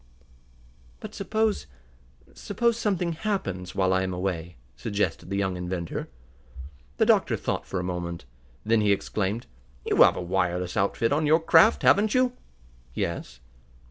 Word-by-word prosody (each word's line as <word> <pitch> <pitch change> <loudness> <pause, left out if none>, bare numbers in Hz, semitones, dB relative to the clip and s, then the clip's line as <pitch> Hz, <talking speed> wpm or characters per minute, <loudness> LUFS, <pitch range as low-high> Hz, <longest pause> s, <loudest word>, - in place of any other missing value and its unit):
"But - - -9
suppose 215 - -1 0.7
suppose 235 +3 0
something 190 -7 -1
happens 155 - -3
while 95 -1 +2
I 95 - +2
am 95 -1 -2
away?" 90 -2 -3 0.2
suggested 100 -4 -2
the 100 - -2
young 95 -2 0
inventor. 90 -1 -4 0.9
The - - +3
doctor - - +3
thought - - -3
for 95 - -3
a - - -3
moment. 85 -4 -4 0.4
Then 110 0 +3
he 105 -1 +4
exclaimed: 100 +3 -2 0.4
"You - - 0
have - - +7
a - - -4
wireless 90 -1 -1
outfit 105 +5 +1
on 150 +1 +1
your 160 +2 +5
craft; 215 +7 +5
haven't 210 +3 +4
you?" 255 -1 +3 0.6
"Yes." 60 0 -4
100 Hz, 140 wpm, -26 LUFS, -, 0.9 s, have